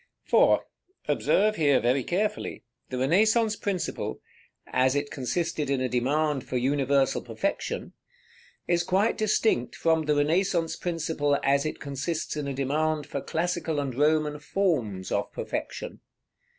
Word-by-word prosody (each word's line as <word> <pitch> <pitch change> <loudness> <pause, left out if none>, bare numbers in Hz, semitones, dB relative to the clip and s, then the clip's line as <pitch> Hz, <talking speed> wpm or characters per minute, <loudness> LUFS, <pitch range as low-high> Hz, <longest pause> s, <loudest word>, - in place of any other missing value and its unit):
§ - - -34 0.2
XVII. - - -30
For, - - +5 0.4
observe 215 +2 +2
here 145 -5 +4
very 125 +2 +1
carefully, 210 - -2 0.3
the 130 - -3
Renaissance 215 - +3
principle, 185 - -3 0.5
as 130 +1 +2
it 145 0 -1
consisted 150 +2 -2
in 140 -1 +1
a 130 - 0
demand 135 +3 0
for 130 - -3
universal 135 +1 +2
perfection, - - -3 0.7
is 175 -1 +2
quite 190 +5 +2
distinct 215 - +1
from 160 -1 +1
the 150 0 +2
Renaissance 165 +3 +1
principle 160 -4 0
as 140 +2 +2
it - - -5
consists 145 +4 -3
in 150 -2 -3
a 140 - -2
demand 150 +3 0
for 140 -2 -4
classical 165 -1 -1
and 140 -3 -2
Roman 150 +2 +2
forms 130 - -1
of - - -1
perfection. - - -5
150 Hz, 140 wpm, -27 LUFS, 135-175 Hz, 0.7 s, For